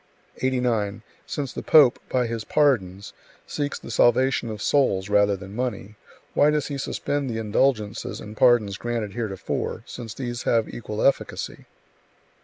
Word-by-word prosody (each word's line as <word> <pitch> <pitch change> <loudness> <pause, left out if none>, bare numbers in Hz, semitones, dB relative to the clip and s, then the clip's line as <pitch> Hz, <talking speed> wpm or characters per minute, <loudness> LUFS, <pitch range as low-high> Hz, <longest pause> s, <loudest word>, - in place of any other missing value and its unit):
89. 115 -5 0 0.2
"Since 140 -3 -4
the - - -5
pope, 145 -6 +6
by 125 -1 +1
his 115 -1 -3
pardons, 105 -10 +1 0.3
seeks 145 -1 -3
the - - -9
salvation 125 0 +3
of 110 -1 -5
souls 100 -7 +1
rather 100 -1 +3
than 100 +1 -10
money, 110 -4 -3 0.4
why 145 - +4
does 150 0 0
he 140 -1 -4
suspend 140 +1 -2
the 115 - -3
indulgences 110 0 0
and 105 +1 -9
pardons 110 -5 +4
granted 115 -4 -3
heretofore, 110 -5 -3
since 115 -4 -8
these 120 -2 -4
have 115 -2 +1
equal 105 -2 -5
efficacy?" 140 - -1
115 Hz, 145 wpm, -24 LUFS, 105-130 Hz, 0.4 s, pope